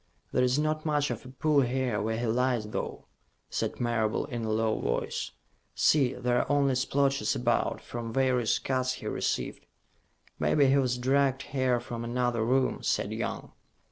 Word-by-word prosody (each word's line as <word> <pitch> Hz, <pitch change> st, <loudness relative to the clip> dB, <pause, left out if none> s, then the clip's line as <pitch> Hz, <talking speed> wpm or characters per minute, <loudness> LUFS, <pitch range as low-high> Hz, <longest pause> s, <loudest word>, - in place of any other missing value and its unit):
"There 125 Hz, -, +2 dB
is 125 Hz, +1 st, +2 dB
not 155 Hz, +1 st, 0 dB
much 150 Hz, -2 st, +1 dB
of 130 Hz, -, -6 dB
a -, -, -9 dB
pool 145 Hz, +2 st, +2 dB
here 125 Hz, -4 st, 0 dB
where 110 Hz, +1 st, -1 dB
he 120 Hz, -, -2 dB
lies, 120 Hz, -1 st, +1 dB
though," -, -, -4 dB, 0.5 s
said -, -, -2 dB
Marable, 115 Hz, -3 st, 0 dB
in 120 Hz, -5 st, -5 dB
a 110 Hz, -, -2 dB
low 110 Hz, 0 st, +1 dB
voice. -, -, -2 dB, 0.5 s
"See, 135 Hz, -4 st, +3 dB
there 125 Hz, 0 st, +1 dB
are -, -, -1 dB
only 140 Hz, -2 st, +3 dB
splotches 140 Hz, +2 st, +1 dB
about, 125 Hz, -, 0 dB
from 115 Hz, -1 st, -6 dB
various 125 Hz, -2 st, +2 dB
cuts 130 Hz, -1 st, -1 dB
he -, -, -9 dB
received." -, -, -2 dB, 0.8 s
"Maybe 145 Hz, -2 st, +3 dB
he 135 Hz, +1 st, +4 dB
was 125 Hz, -2 st, +1 dB
dragged 135 Hz, +1 st, +2 dB
here 130 Hz, -3 st, 0 dB
from 120 Hz, -1 st, -6 dB
another 120 Hz, -1 st, 0 dB
room," 130 Hz, +3 st, +1 dB
said -, -, 0 dB
Young. -, -, -4 dB
125 Hz, 170 wpm, -29 LUFS, 120-135 Hz, 0.8 s, he